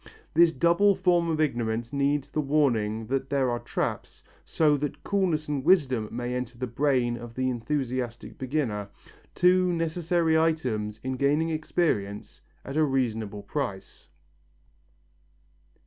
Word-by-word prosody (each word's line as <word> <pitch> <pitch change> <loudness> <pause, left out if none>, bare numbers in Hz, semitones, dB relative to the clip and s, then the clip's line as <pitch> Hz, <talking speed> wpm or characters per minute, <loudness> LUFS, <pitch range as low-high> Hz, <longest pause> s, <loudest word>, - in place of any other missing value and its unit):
This 170 0 +6
double 170 +7 +3
form 175 -2 +2
of 160 -1 -1
ignorance 120 -4 -1
needs 140 0 0
the 155 - 0
warning 120 -7 +1
that 135 +3 -2
there 135 -3 +1
are 120 - -1
traps, 120 - -4 0.2
so 150 -2 +2
that 145 0 -4
coolness 180 -6 0
and 145 -3 -2
wisdom 130 - +3
may 120 +1 -3
enter 125 -1 -4
the 130 - -2
brain 125 -1 +1
of 120 -1 -10
the 130 0 0
enthusiastic 125 -1 -3
beginner, 125 -7 -2 0.5
two 180 0 +4
necessary 165 0 0
items 125 -10 -1
in 130 0 -3
gaining 150 +5 +1
experience 155 - -2 0.2
at 135 +2 -4
a 155 - +4
reasonable 115 -7 -1
price. 100 -4 -5
135 Hz, 130 wpm, -27 LUFS, 120-160 Hz, 0.5 s, This